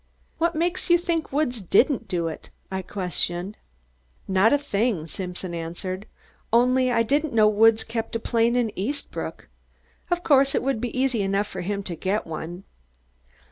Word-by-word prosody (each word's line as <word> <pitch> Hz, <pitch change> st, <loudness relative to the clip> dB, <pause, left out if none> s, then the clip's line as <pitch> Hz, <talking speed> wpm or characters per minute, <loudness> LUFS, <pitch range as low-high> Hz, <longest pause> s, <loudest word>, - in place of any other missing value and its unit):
"What 335 Hz, 0 st, +1 dB
makes 350 Hz, +3 st, -1 dB
you 345 Hz, -, +7 dB
think 335 Hz, -2 st, -2 dB
Woods 265 Hz, -5 st, 0 dB
didn't 230 Hz, -, +2 dB
do 175 Hz, -4 st, -1 dB
it?" 160 Hz, -, -7 dB, 0.2 s
I 190 Hz, 0 st, -2 dB
questioned. 180 Hz, 0 st, -2 dB, 0.7 s
"Not 190 Hz, +3 st, +4 dB
a 290 Hz, -, +5 dB
thing," 225 Hz, -, -1 dB
Simpson 180 Hz, +1 st, -6 dB
answered, 175 Hz, +4 st, -5 dB, 0.4 s
"only 250 Hz, +2 st, +4 dB
I 230 Hz, -1 st, +3 dB
didn't 290 Hz, +5 st, 0 dB
know 215 Hz, -2 st, +5 dB
Woods 220 Hz, +1 st, +5 dB
kept 225 Hz, 0 st, -4 dB
a -, -, +1 dB
plane 230 Hz, +1 st, +1 dB
in 240 Hz, -3 st, +1 dB
Eastbrook. 260 Hz, +10 st, -4 dB, 0.6 s
Of 350 Hz, 0 st, 0 dB
course, 275 Hz, -2 st, +4 dB
it -, -, +1 dB
would 270 Hz, -4 st, 0 dB
be 245 Hz, +1 st, -3 dB
easy 255 Hz, -5 st, +1 dB
enough 195 Hz, +1 st, +1 dB
for 190 Hz, -3 st, -6 dB
him 200 Hz, +2 st, -2 dB
to 180 Hz, -3 st, -5 dB
get 195 Hz, +6 st, -1 dB
one. 165 Hz, +3 st, -6 dB
225 Hz, 165 wpm, -25 LUFS, 190-265 Hz, 0.7 s, you